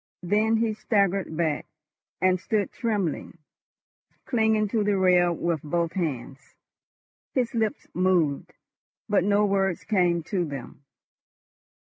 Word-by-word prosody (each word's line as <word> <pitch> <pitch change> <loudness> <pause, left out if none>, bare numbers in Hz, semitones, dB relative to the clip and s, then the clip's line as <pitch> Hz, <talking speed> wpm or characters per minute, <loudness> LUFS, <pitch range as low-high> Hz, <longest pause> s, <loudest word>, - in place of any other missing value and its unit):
Then 215 +5 +2
he 225 -1 +1
staggered 200 -6 0
back, 160 -3 -1 0.5
and 185 0 +3
stood 210 +1 -1
trembling, 205 - -2 0.9
clinging 220 -3 +2
to 220 0 +1
the 205 -1 +1
rail 180 -2 +4
with 170 -2 -1
both 170 +2 -1
hands. 140 -6 -5 0.8
His 250 -3 0
lips 220 -2 -1
moved, 175 -6 +1 0.6
but 205 -3 +2
no 205 +1 +3
words 195 -3 0
came 175 -5 +1
to 180 +2 -1
them. 140 -3 -7
185 Hz, 115 wpm, -26 LUFS, 170-210 Hz, 0.9 s, rail